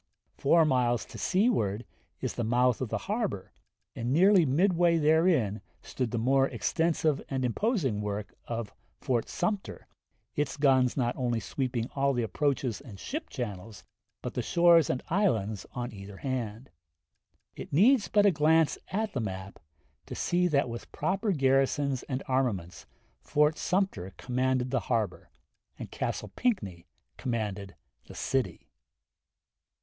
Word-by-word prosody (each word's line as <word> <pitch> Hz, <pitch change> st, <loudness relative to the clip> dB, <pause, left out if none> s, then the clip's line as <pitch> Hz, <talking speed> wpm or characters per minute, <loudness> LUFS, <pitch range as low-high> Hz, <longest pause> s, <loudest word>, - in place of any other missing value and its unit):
Four 165 Hz, +3 st, +4 dB
miles 120 Hz, -5 st, +1 dB
to -, -, -10 dB
seaward 180 Hz, -, +1 dB, 0.4 s
is -, -, -2 dB
the 120 Hz, -, -3 dB
mouth 125 Hz, +2 st, +2 dB
of 130 Hz, -, -2 dB
the 115 Hz, -, -1 dB
harbor, 205 Hz, -, -3 dB, 0.4 s
and 120 Hz, +2 st, -2 dB
nearly 180 Hz, +2 st, +5 dB
midway 170 Hz, +3 st, +3 dB
therein 155 Hz, -, +3 dB, 0.2 s
stood 125 Hz, -3 st, -3 dB
the 120 Hz, -, -3 dB
more 135 Hz, +4 st, +3 dB
extensive 160 Hz, -3 st, 0 dB
and 130 Hz, -2 st, -1 dB
imposing 135 Hz, -, 0 dB
work 105 Hz, 0 st, -4 dB
of 115 Hz, -3 st, -4 dB, 0.3 s
Fort 120 Hz, -3 st, -1 dB
Sumter, 195 Hz, +2 st, -3 dB, 0.5 s
its 145 Hz, 0 st, -2 dB
guns 130 Hz, -3 st, +3 dB
not 120 Hz, -2 st, 0 dB
only 120 Hz, -3 st, -1 dB
sweeping 120 Hz, +1 st, -2 dB
all 140 Hz, 0 st, +1 dB
the 120 Hz, -2 st, 0 dB
approaches 130 Hz, +1 st, -1 dB
and 105 Hz, -8 st, -11 dB
ship 305 Hz, -, -5 dB
channels, 105 Hz, -4 st, -6 dB, 0.4 s
but -, -, -4 dB
the -, -, -1 dB
shores 170 Hz, -3 st, +5 dB
and 125 Hz, -, -1 dB
islands 110 Hz, -, 0 dB
on 120 Hz, -2 st, -4 dB
either 100 Hz, -1 st, -10 dB
hand. 120 Hz, -3 st, -4 dB, 0.8 s
It -, -, -8 dB
needs 215 Hz, -, +5 dB
but 205 Hz, -1 st, +3 dB
a 200 Hz, -, +6 dB
glance 160 Hz, 0 st, +3 dB
at 215 Hz, +2 st, -2 dB
the 130 Hz, -, -1 dB
map 95 Hz, -2 st, -6 dB, 0.5 s
to -, -, -6 dB
see 180 Hz, 0 st, +1 dB
that 140 Hz, -5 st, +2 dB
with 120 Hz, -1 st, -7 dB
proper 195 Hz, +3 st, -1 dB
garrisons 135 Hz, -2 st, +2 dB
and 130 Hz, 0 st, -2 dB
armaments 120 Hz, -10 st, -1 dB, 0.3 s
Fort 150 Hz, +1 st, +2 dB
Sumter 180 Hz, -, -1 dB
commanded 130 Hz, 0 st, 0 dB
the 130 Hz, -, +2 dB
harbor. 110 Hz, -6 st, -1 dB, 0.5 s
and -, -, -8 dB
Castle -, -, -3 dB
Pinckney 100 Hz, -, -1 dB, 0.3 s
commanded 105 Hz, -5 st, -3 dB, 0.3 s
the -, -, -11 dB
city. 135 Hz, -1 st, -2 dB
130 Hz, 140 wpm, -29 LUFS, 115-165 Hz, 0.8 s, a